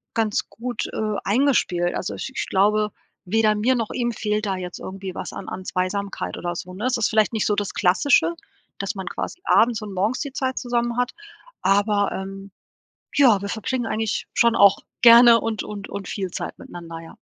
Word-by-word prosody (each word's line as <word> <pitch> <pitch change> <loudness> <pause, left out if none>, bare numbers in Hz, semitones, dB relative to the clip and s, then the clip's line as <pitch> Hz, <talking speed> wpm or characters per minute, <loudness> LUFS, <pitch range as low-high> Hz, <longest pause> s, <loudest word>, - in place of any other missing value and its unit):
ganz 220 -2 0
gut, 245 +3 -4
äh, 215 -1 -1
eingespielt. 200 -7 +2
Also, - - -3
ich - - -6
ich - - -2
glaube, 210 +2 +2 0.4
weder 215 +2 +3
mir 235 +5 +2
noch 230 -3 -2
ihm 240 -1 -1
fehlt 215 -1 -2
da 195 - 0
jetzt 180 -1 -6
irgendwie 190 0 -7
was - - -5
an - - -7
an 185 - -7
Zweisamkeit 195 +2 -3
oder 175 0 -3
so, 180 +1 -7
ne? 210 +6 -5
Es 255 - +1
ist 225 - +1
vielleicht 220 0 +2
nicht 220 - 0
so 210 - +2
das 205 -1 -2
Klassische, 180 - +3 0.5
dass 200 - -2
man 190 -2 -6
quasi - - -5
abends 235 -1 +3
und 210 -2 -7
morgens 205 +7 0
die 280 - -4
Zeit 260 -2 -2
zusammen 240 -1 -1
hat, 245 0 0 0.5
aber, 205 +1 +2
ähm 195 +1 -7 0.7
ja, 240 -8 +5
wir 200 - -5
verbringen 240 +3 -2
eigentlich 220 -1 -2
schon 235 -1 +4
auch 200 -3 +6 0.2
gerne 235 0 +8
und 225 -1 -2
und 205 -1 -7
und 200 -2 -6
viel 190 -3 -3
Zeit - - -6
miteinander, 170 -1 -9
ja. 165 - -13
210 Hz, 195 wpm, -23 LUFS, 195-235 Hz, 0.7 s, gerne